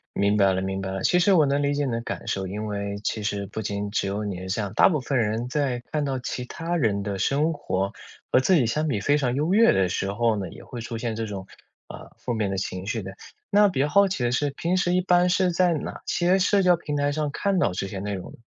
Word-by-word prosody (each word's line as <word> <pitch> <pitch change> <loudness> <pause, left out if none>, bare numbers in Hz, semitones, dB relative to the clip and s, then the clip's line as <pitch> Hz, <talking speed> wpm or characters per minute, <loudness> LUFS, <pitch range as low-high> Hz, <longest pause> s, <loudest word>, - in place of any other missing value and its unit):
明 100 +1 +2
白 100 -2 +4
了 95 - -1
明 95 0 -3
白 95 0 -4
了， 95 0 -4
其 180 - +3
实 195 +3 +4
我 155 -5 +5
能 140 +1 +1
理 145 0 +1
解 145 0 0
你 130 - -2
的 115 0 -2
感 - - -6
受， 95 -1 -2
因 105 +3 -4
为， 100 -1 -3
其 110 - -2
实 100 -1 -2
不 105 +3 -6
仅 100 -1 -3
只 100 -2 0
有 105 +2 -2
你 100 -3 -3
是 95 - -7
这 105 - -1
样， 100 -2 -4
大 - - +6
部 155 -5 0
分 130 +1 -1
人 115 +1 0
在 130 -2 -1
看 150 -2 0
到 135 -2 -2
其 125 +1 -4
他 165 +6 -4
人 105 -10 +1
的 100 -1 -3
生 150 - +1
活， 95 -8 -2 0.4
和 - - +5
自 185 +8 +3
己 135 -8 +3
相 155 +7 0
比 110 -8 0
非 145 +8 +2
常 125 -3 0
优 155 +6 +1
越 230 +2 +6
的 95 -1 +2
时 95 +2 -2
候 115 +1 +1
呢， 95 -4 -4
也 - - -12
会 120 -2 -8
出 115 0 -5
现 115 -1 -3
这 115 - -3
种， 100 -3 -6 0.4
啊， - - -10
负 125 - -3
面 110 -3 -1
的 95 - -2
情 95 0 -4
绪 115 0 -2
的。 95 - -6 0.4
那 205 0 +6
比 135 - -3
较 145 - +3
好 200 +5 +4
奇 160 -10 -2
的 120 - +1
是， 145 +3 +1
平 170 +5 -1
时 180 -1 +1
一 185 - +3
般 180 0 +3
是 185 0 +2
在 175 0 +3
哪 155 - -5
些 180 +2 +2
社 200 +1 +3
交 180 -1 +5
平 150 -3 -5
台 145 0 +1
上 150 0 -1
看 195 +4 0
到 100 - +2
这 95 +2 -3
些 95 -1 -6
内 100 +1 -3
容 95 - -6
呢？ - - -15
120 Hz, 305 characters per minute, -25 LUFS, 100-155 Hz, 0.4 s, 大